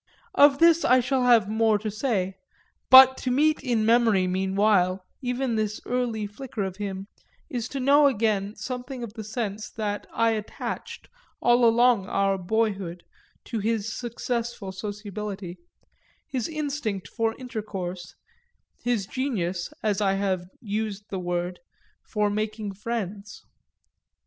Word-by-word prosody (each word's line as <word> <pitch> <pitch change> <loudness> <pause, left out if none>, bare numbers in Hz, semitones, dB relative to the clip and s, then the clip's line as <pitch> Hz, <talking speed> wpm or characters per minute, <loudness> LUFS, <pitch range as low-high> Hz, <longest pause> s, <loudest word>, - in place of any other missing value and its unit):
Of 285 -1 +6
this 335 +1 +5
I 255 +1 +5
shall 255 +1 +1
have 235 -5 +5
more 220 0 +2
to 215 +1 -4
say, 205 -4 -1 0.6
but 260 0 +10
to 255 - -3
meet 300 +5 +3
in 235 -5 +1
memory 225 -5 +4
meanwhile 190 0 +1 0.2
even 250 -2 -1
this 215 -1 -1
early 240 -3 -1
flicker 210 +1 -5
of 190 -1 -4
him 195 -2 -4 0.5
is 245 -2 -3
to 275 - -4
know 285 +3 +5
again 215 -4 0
something 250 +3 -6
of 220 -3 -7
the 220 -1 -7
sense 215 -1 -4
that 205 -2 -4
I 230 0 +2
attached 215 -1 -5 0.3
all 240 0 +4
along 230 -3 +4
our 195 -1 +1
boyhood 195 -3 -1 0.4
to 230 - -3
his 220 0 -1
successful 235 -3 -4
sociability, 205 -2 -6 0.7
his 255 -5 -3
instinct 290 - -3
for 225 -1 -1
intercourse, 195 -7 -6 0.7
his 235 -5 0
genius 190 -8 -2
(as 210 -1 +1
I 195 -1 +3
have 190 -2 -1
used 210 -1 -4
the 190 - -2
word) 175 0 -3 0.4
for 210 -1 -1
making 215 -1 -3
friends. 205 -1 -5
215 Hz, 135 wpm, -26 LUFS, 195-245 Hz, 0.7 s, but